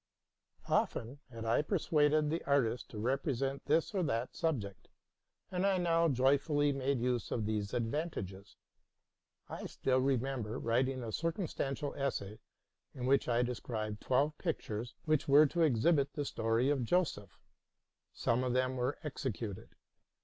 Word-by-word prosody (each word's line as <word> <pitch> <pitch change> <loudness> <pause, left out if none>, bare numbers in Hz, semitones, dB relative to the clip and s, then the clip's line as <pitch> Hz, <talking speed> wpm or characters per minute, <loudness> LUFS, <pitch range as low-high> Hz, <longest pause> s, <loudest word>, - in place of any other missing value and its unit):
Often 120 +5 0
had 115 -2 -7
I 115 +4 +3
persuaded 150 -3 +2
the 165 - -2
artists 130 -4 +1
to 110 - -10
represent 135 +3 -1
this 160 +7 +2
or 195 - +1
that 125 -7 -1
subject, 125 - -2 0.6
and 180 0 -1
I 195 -1 +3
now 170 -1 +3
joyfully 145 +3 +3
made 135 -1 0
use 125 -1 -1
of 110 - -1
these 105 -1 -2
advantages. 115 - -3 0.9
I - - -6
still 130 -1 +1
remember 130 -3 -1
writing 130 +2 0
a 115 - -4
circumstantial 155 - -2
essay, 115 -7 -3 0.6
in 125 -2 -4
which 140 +2 +3
I 120 0 +3
described 110 -3 -4
twelve 140 +4 +1
pictures 115 - -3
which 155 -2 +1
were 145 +2 +7
to 170 +4 -1
exhibit 145 +1 +3
the 145 - -3
history 115 0 +1
of 135 -4 0
Joseph: 115 - 0 0.7
some 120 +2 0
of 125 -1 0
them 130 0 +1
were 125 +3 -1
executed. 120 -8 -4
130 Hz, 140 wpm, -33 LUFS, 115-150 Hz, 0.9 s, were